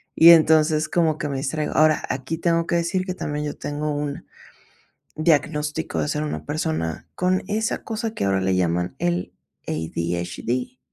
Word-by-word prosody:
Y 165 +1 +9
entonces, 155 -1 +5
como 160 -3 +2
que 150 -5 -3
me 135 - -2
distraigo. 150 +2 -2
Ahora, 155 0 +4
aquí 130 +5 -3
tengo 170 0 +1
que - - 0
decir 175 +2 0
que 185 - -3
también 150 -4 -3
yo 145 - -4
tengo 150 +1 -3
un 145 -1 -4 0.9
diagnóstico 150 -1 0
de - - -1
ser 150 0 -1
una 150 - -4
persona 150 - -3
con 185 +1 +1
esa 220 +2 -1
cosa 225 0 -3
que - - -2
ahora 95 -1 +2
le 95 0 +1
llaman 90 0 0
el 85 +1 -1 0.3
ADHD. 85 - -3
150 Hz, 165 wpm, -23 LUFS, 125-165 Hz, 0.9 s, Y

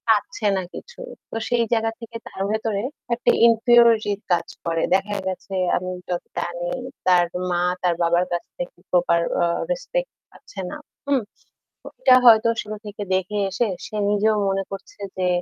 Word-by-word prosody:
পাচ্ছে 220 -1 -2
না - - 0
কিছু। 485 0 -10 0.3
তো - - -8
সেই 240 -1 +3
জায়গা 225 -1 +2
থেকে 230 -1 -11
তার 190 - -8
ভেতরে 220 -2 -1 0.3
একটা 235 - +2
ইনফিউরিটি 230 -2 +5 0.2
কাজ 175 - +2 0.2
করে। 165 -1 0
দেখা 200 +2 -1
গেছে 190 +1 -5 0.2
আমি 185 0 -4 0.2
যত 175 -1 -2
জানি 175 0 -3 0.4
তার 180 -1 +5 0.2
মা 175 -1 +1 0.2
তার 175 -1 +2
বাবার 170 +1 +3
কাছ 175 0 -1
থেকে - - -6
প্রপার 175 -1 +3 0.2
আ - - +4 0.3
রেসপেক্ট - - -2 0.2
পাচ্ছে 200 - -13
না। - - -6 0.3
হুম? 280 -3 +2 0.6
তো - - -12
এটা 255 - +7
হয়তো 230 -1 +7
শুরু 215 0 -6
থেকে 205 0 -6
দেখে 190 +3 -2
এসে 195 +6 0 0.2
সে 215 - -8
নিজেও 215 +1 +3
মনে 195 0 0
করছে 195 0 -9 0.2
যে 185 - +1
210 Hz, 165 wpm, -23 LUFS, 180-235 Hz, 0.6 s, এটা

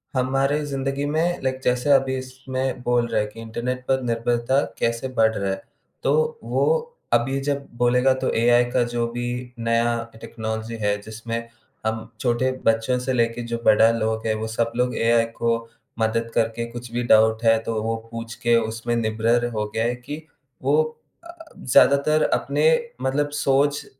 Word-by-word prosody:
हमारे 135 +3 +1
ज़िंदगी 135 0 -2
में 175 +2 +1
लाइक 130 0 -1
जैसे 125 +3 +1
अभी 135 -1 +4
इसमें 130 0 -4
बोल 120 -1 +2
रहा - - 0
है 105 - -2
कि 110 +2 -13
इंटरनेट 125 +3 -4
पर 130 0 +2
निर्भरता 120 +2 +1 0.2
कैसे 115 +2 0
बढ़ 110 0 +5
रहा 100 -1 -1
है? 95 - -4 0.4
तो 470 0 +1
वो - - 0 0.5
अभी 135 +3 +2
जब 140 0 -2
बोलेगा, 125 +2 +3
तो 130 - -1
एआई 120 +1 +4
का 125 -1 +3
जो 120 -1 0
भी 120 +1 -3 0.3
नया 115 0 +1 0.2
टेक्नोलॉजी 110 0 -5
है, 105 0 +1
जिसमें 115 +2 -5 0.4
हम 110 0 -2
छोटे 130 +1 +1
बच्चों 115 +3 +2
से 130 +1 -2
लेके 115 0 +1
जो - - +1
बड़ा 110 +1 +6
लोग 110 0 -1
है, 110 - +2
वो 110 +1 -3
सब 115 +1 -1
लोग 125 +1 0
एआई 115 0 +3
को 115 0 +2 0.4
मदद 115 +1 0
करके 115 +1 0
कुछ 120 0 -8
भी 120 +1 -1
डाउट 110 0 +4
है 115 -1 +5
तो 110 -1 -2
वो 115 0 -1 0.2
पूछ 115 0 -6
के 120 0 +4
उसमें 115 +1 -2
निर्भर 115 +1 +1
हो 105 -1 -1
गए 110 - +1
हैं 120 - -1
कि 145 +5 -6 0.4
वो 145 +3 +4 0.4
अ, 340 0 -11 0.2
ज़्यादातर 140 +4 +4
अपने - - 0 0.4
मतलब 145 +2 0
सोच 145 +2 +2
120 Hz, 170 wpm, -23 LUFS, 115-130 Hz, 0.5 s, बड़ा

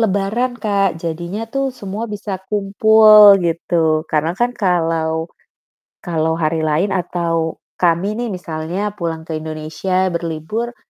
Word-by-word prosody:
lebaran 220 +4 0
Kak 200 -5 0
jadinya 170 +6 -4
tuh 275 0 0
semua 220 -2 -6
bisa 205 -2 -5
kumpul 210 0 +6
gitu. 165 -2 0
Karena 155 +2 0
kan 240 +7 0
kalau 165 -4 0 0.8
kalau 160 -2 0
hari 160 0 0
lain 160 +6 +1
atau 170 -3 -1 0.2
kami 175 +2 +2
nih 240 - -2
misalnya 175 +4 -4
pulang 165 -2 -3
ke 160 -1 -4
Indonesia 160 +4 -2
berlibur, 170 +9 -4
175 Hz, 120 wpm, -18 LUFS, 160-205 Hz, 0.8 s, kumpul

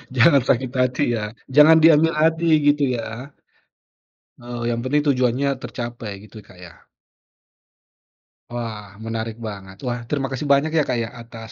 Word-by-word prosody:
Jangan 135 +3 +5
sakit 130 0 +1
hati 125 0 +1
ya, 105 - -3 0.3
jangan 155 +2 +8
diambil 160 0 +5
hati 160 +2 +2 0.2
gitu 145 0 +3
ya. 115 +4 -7 1.1
Oh 120 -1 -6
yang 120 0 -1
penting 145 +4 +1
tujuannya 125 +2 0
tercapai 120 -2 -6 0.2
gitu 110 0 -13
Kak, 90 - -19
ya. 90 -2 -14 1.7
Wah 115 -3 -5 0.2
menarik 115 0 -4
banget. 95 -2 -9
Wah, 120 0 -2
terima 140 -2 -1
kasih 135 +3 -4
banyak 150 +3 +1
ya 150 - +4
Kak 125 - 0
ya 110 - -6
atas 115 -1 -11
120 Hz, 145 wpm, -21 LUFS, 115-145 Hz, 1.7 s, jangan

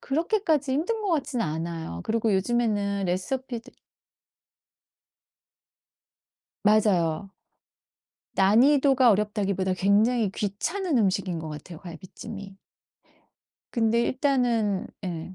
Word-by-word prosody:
그렇게까지 315 -2 0
힘든 360 - -1
것 405 - -1
같지는 275 - -1
않아요. 160 - -4
그리고 225 -2 0
요즘에는 205 -2 0
레시피도 240 +7 -3 2.9
맞아요. 200 -4 +2 1.1
난이도가 260 +5 +5
어렵다기보다 200 -3 0
굉장히 210 +3 +2
귀찮은 290 - -1
음식인 190 -4 0
것 160 -1 -6
같아요, 155 +2 -9
갈비찜이. 195 +3 -10 1.2
근데 230 0 +2
일단은 240 -7 0 0.2
예. 175 0 -5
210 Hz, 240 characters per minute, -26 LUFS, 190-255 Hz, 2.9 s, 난이도가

